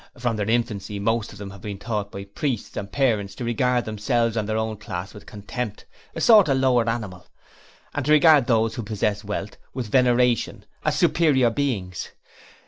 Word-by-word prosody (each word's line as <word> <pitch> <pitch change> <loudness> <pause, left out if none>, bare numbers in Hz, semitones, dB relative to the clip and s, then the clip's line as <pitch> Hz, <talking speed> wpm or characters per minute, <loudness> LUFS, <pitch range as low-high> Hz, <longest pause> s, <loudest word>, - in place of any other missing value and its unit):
From 120 -2 -1
their 105 0 -2
infancy 105 -3 -1
most 115 +2 -1
of 105 - -12
them 100 -1 -7
have 100 -1 -12
been 100 -2 -6
taught 105 -1 -3
by 100 - -6
priests 115 +4 -4
and 100 0 -5
parents 105 -8 0
to 125 - -6
regard 120 +1 +1
themselves 115 +2 0
and 110 -2 -2
their 110 - 0
own 110 -1 -2
class 95 -2 -6
with 105 -2 -13
contempt 105 +2 -6 0.3
a - - -4
sort 215 -8 +7
of 135 - +3
lower 125 -3 +3
animals 105 -6 -5 0.6
and 145 - -2
to - - +3
regard 155 -4 +6
those 115 -2 +2
who 120 - -4
possess 105 -1 -2
wealth 105 0 -5 0.2
with 120 -5 -4
veneration, 125 -2 +2 0.2
as - - 0
superior 135 -8 +3
beings. 110 -10 -2
115 Hz, 185 wpm, -24 LUFS, 105-125 Hz, 0.6 s, sort